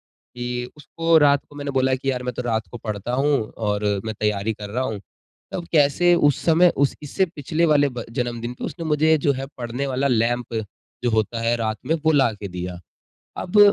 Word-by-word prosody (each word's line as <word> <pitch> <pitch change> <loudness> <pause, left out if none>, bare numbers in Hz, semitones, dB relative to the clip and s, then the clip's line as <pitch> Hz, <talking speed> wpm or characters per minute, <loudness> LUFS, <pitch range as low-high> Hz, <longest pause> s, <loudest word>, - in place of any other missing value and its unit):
कि 125 0 -6
उसको 165 +3 +1
रात 145 -1 +5
को 145 - -15
मैंने 145 -1 -4
बोला 130 0 +2
कि 135 +1 -1
यार 125 -1 -3
मैं 125 0 -3
तो 125 - -3
रात 110 -3 -1
को 120 - -6
पढ़ता 105 +2 -4
हूँ 140 +3 +2 0.3
और 105 -2 -1 0.2
मैं 110 0 -3
तैयारी 105 0 0
कर 105 0 -8
रहा 125 +4 -1
हूँ। 110 -5 -3 0.5
तब 175 -2 -3
कैसे 155 +4 +4
उस 145 -4 +3
समय 170 +2 +6
उस 140 0 +2
इससे 190 +6 +1
पिछले 165 0 -1
वाले 145 -2 +4
ब 125 -3 -6
जन्मदिन 120 0 -3
पे - - -6
उसने 170 -2 -6
मुझे 155 +1 +3
जो 140 0 +2
है 135 +1 -4
पढ़ने 125 +3 -3
वाला 135 +1 0
लैंप 120 -1 0 0.5
जो 120 - +2
होता 110 +1 0
है 115 +1 +2
रात 110 -1 -1
में 160 - +2
वो 160 - +6
ला 135 -5 +4
के 100 -1 -7
दिया। 90 -1 -6 0.6
अब 195 +3 +2
125 Hz, 210 wpm, -23 LUFS, 115-145 Hz, 0.6 s, समय